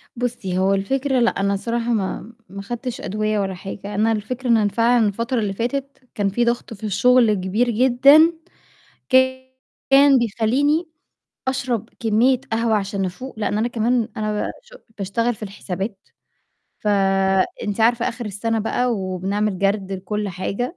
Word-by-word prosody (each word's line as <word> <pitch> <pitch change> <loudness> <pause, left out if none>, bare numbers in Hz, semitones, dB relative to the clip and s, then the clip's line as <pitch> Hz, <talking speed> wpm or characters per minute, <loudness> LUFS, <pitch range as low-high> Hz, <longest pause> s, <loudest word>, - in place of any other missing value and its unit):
بُصّي، 235 -7 -3
هو 190 +1 +2
الفكرة 265 +7 0
لأ، 235 - +4
أنا 200 0 +1
الصراحة 230 +4 -1
ما 215 +2 -3 0.2
ما 200 +1 -7
خدتش 240 +4 -5
أدوية 215 +1 -1
ولا 190 -1 -1
حاجة، 200 +2 -7
أنا 220 +2 +2
الفكرة 240 +4 -3
إن 230 - +6
أنا 210 -2 +2
فعلًا 230 +2 +3
الفترة 230 +4 -1
اللي 200 -2 -1
فاتت 270 +5 -4
كان 200 -1 0
فيه 240 +5 0
ضغط 235 -1 -1
في 215 - -14
الشغل 235 +2 +4
كبير 205 +5 0
جدًا، 265 +7 +5 0.8
كان 260 +1 +3
بيخلّيني 255 - +1 0.6
أشرب 250 -4 -2
كمية 235 +3 +3
قهوة 225 -1 +2
عشان 195 -1 -2
أفوق، 220 +6 -7
لإن 210 0 -1
أنا 230 +2 +1
كمان 235 0 0
أنا 215 -1 -1
ب - - -4
ش - - -18 0.2
باشتغل 230 +5 -1
في 215 - -18
الحسابات، 195 0 -6 0.7
ف - - -11 0.8
أنتِ 205 +1 -3
عارفة 235 +1 +3
آخر 235 -1 -6
السنة 225 +3 -2
بقى 245 +3 0
وبنعمل 195 0 -2
جَرد 195 0 0
لكلّ 205 +2 -3
حاجة، 200 - -4
225 Hz, 155 wpm, -21 LUFS, 200-245 Hz, 0.8 s, إن